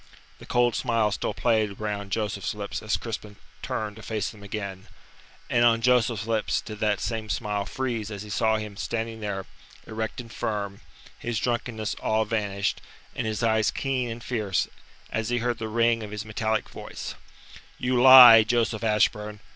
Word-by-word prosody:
The - - -13
cold 120 -1 +2
smile 115 -4 +1
still 100 - -2
played 110 -4 +1
round 105 -2 -3
Joseph's 105 -2 -2
lips 100 -1 -5
as 105 - 0
Crispin 105 -2 -6 0.3
turned 105 -1 -4
to - - -10
face 110 -2 -3
them 105 - -15
again, 100 -2 -6 0.6
and 120 -1 +2
on 115 -1 +5
Joseph's 115 -3 +2
lips 110 -1 0
did 105 -1 -8
that 105 -2 +1
same 110 -2 -3
smile 105 -1 -2
freeze 120 -5 -3
as 105 -1 -6
he 105 - -9
saw 110 +2 +2
him 105 -2 -6
standing 115 0 -3
there, 100 -3 -4 0.4
erect 110 0 -4
and 115 -2 -8
firm, 100 -2 -3 0.4
his 120 -1 -3
drunkenness 115 -2 -2
all 110 0 +1
vanished, 100 -3 -1 0.3
and - - -2
his 110 +1 -2
eyes 110 -2 +3
keen 130 -3 -1
and 115 +1 -7
fierce; 105 -7 -1 0.4
as 110 0 -2
he 120 - +1
heard 120 -1 -1
the 110 - -3
ring 115 +1 +2
of 105 - -6
his 105 +1 -5
metallic 110 0 -1
voice: - - -7 0.6
"You 125 0 +1
lie, 125 -3 +11
Joseph 115 0 0
Ashburn. 105 -1 +1
110 Hz, 170 wpm, -26 LUFS, 105-115 Hz, 0.6 s, lie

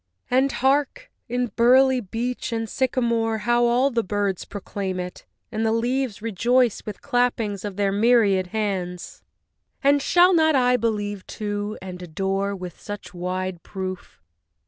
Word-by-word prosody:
And 265 +2 +3
hark! 275 +2 0 0.2
in 245 -1 -1
burly 260 +2 +5
beech 240 +4 -4
and 225 -1 -2
sycamore 235 -2 0
How 240 0 +3
all 250 +4 +3
the 235 -1 +1
birds 200 -1 -1
proclaim 195 -2 -4
it! 180 0 -7 0.2
and 220 0 -2
the 220 - +2
leaves 240 -1 -1
Rejoice 235 +2 +2
with 210 - -7
clappings 230 -5 0
of 205 -2 -5
their 200 0 +1
myriad 205 -3 +3
hands! 185 -4 -3 0.6
And 285 +1 +4
shall 355 +5 +5
not 315 -2 +4
I 250 -1 +4
believe, 205 -4 -2
too, 205 0 -4
and 180 -1 -7
adore, 195 +3 -2
With 180 -3 -8
such 205 -1 -8
wide 180 0 -3
proof? 185 - -7
220 Hz, 145 wpm, -23 LUFS, 195-245 Hz, 0.6 s, burly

